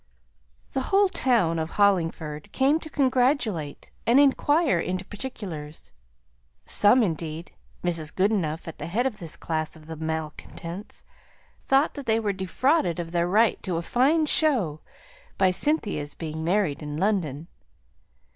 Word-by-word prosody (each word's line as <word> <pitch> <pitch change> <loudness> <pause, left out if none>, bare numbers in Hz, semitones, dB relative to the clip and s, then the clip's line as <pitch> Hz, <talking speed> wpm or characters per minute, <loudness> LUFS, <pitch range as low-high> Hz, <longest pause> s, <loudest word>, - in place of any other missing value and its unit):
The 265 - -1
whole 395 0 +4
town 230 - +2
of 160 0 -2
Hollingford 165 -6 +1
came 280 +4 +2
to 315 - -9
congratulate 255 - 0 0.2
and 240 +4 +6
inquire 290 - +3
into 180 +2 -3
particulars. 185 - -7 0.7
Some 235 +4 +4
indeed 165 -2 -4 0.3
Mrs. 165 -4 -1
Goodenough 185 -6 0
at 165 - -8
the - - -5
head 220 +9 0
of 250 -6 -1
this 170 -5 -3
class 155 -1 -3
of 160 0 -10
malcontents 160 +4 -6 0.6
thought 275 +3 +3
that 285 -3 -8
they 220 0 +3
were 210 -3 -1
defrauded 190 - +1
of 165 -1 -5
their 170 0 +1
right 215 +5 +3
to 180 -4 -2
a 170 - -3
fine 285 - +2
show 255 - +2 0.6
by 190 -1 +4
Cynthia's 200 - 0
being 160 -1 -5
married 170 -4 0
in 150 0 -5
London. 170 -6 -1
185 Hz, 135 wpm, -25 LUFS, 160-255 Hz, 0.7 s, and